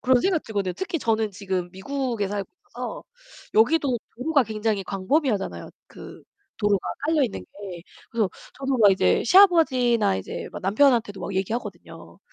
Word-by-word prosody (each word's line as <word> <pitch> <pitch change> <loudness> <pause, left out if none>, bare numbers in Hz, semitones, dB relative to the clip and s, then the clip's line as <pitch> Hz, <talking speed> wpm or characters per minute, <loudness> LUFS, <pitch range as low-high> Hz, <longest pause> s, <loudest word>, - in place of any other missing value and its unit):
그런 255 -1 +3
생각이 365 -2 +1
들거든요. 200 -4 -2
특히 355 - -3
저는 220 -3 0
지금 190 -2 -3
미국에 235 +1 -3
살고 200 0 -4 0.2
있어서 - - -6 0.5
여기도 250 +2 +3 0.2
도로가 280 +3 +2
굉장히 215 -2 -2
광범위하잖아요. 205 - -1 0.2
그 - - -12 0.3
도로가 205 -3 0 0.2
깔려있는 300 - +1
게. 180 - -10 0.3
그래서 220 -5 +1 0.3
저도 270 -1 -1
막 205 -2 +7
이제 90 - +3
시아버지나 255 - +5
이제 95 - -6
막 - - -8
남편한테도 220 0 +2
막 195 - -5
얘기하거든요. 215 +6 -5
225 Hz, 370 characters per minute, -24 LUFS, 195-270 Hz, 0.5 s, 막